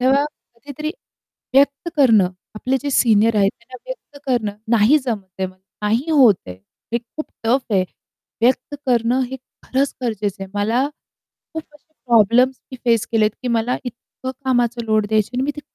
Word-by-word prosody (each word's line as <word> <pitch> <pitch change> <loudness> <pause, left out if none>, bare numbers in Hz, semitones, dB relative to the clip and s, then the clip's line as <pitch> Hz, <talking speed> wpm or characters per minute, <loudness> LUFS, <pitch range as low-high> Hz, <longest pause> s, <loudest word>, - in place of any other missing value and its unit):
तेव्हा 270 +3 +4 0.3
कधीतरी 285 +6 -6 0.6
व्यक्त 280 +4 +3
करणं, 225 -10 +5 0.3
आपले 255 +5 0
जे 285 - -2
सीनियर 225 -3 +4
आहेत 195 -1 +4
त्यांना 255 - -12
व्यक्त 480 -13 -9
करणं 220 -6 0 0.2
नाही 225 +8 +5
जमत 220 -6 -2
आहे, 190 - +1
नाही 210 - -3
होत 260 -9 +7
आहे, 90 - -7 0.4
हे 235 - +2
खूप 245 +6 -8 0.2
टफ 245 0 +1
आहे 185 -2 +3 0.6
व्यक्त 255 +4 +2
करणं 240 +1 +2
हे 265 - -4 0.3
खरंच 270 +2 0
गरजेचं 205 -4 -2
आहे. 190 - -7
मला 225 +7 +1 0.7
खूप 320 -1 -4
असे 305 +2 -23
प्रॉब्लेम्स 240 +3 +4
मी - - -5
फेस 230 -2 +3
केलेत 215 -1 +3
की 250 - -2
मला 235 +1 +1
इतकं 245 +2 -7
कामाचा 245 -2 +1
लोड 215 -1 +2
द्यायची 215 0 +1
आणि 255 - +1
मी 290 - 0
ते - - -5
240 Hz, 165 wpm, -20 LUFS, 215-265 Hz, 0.7 s, होत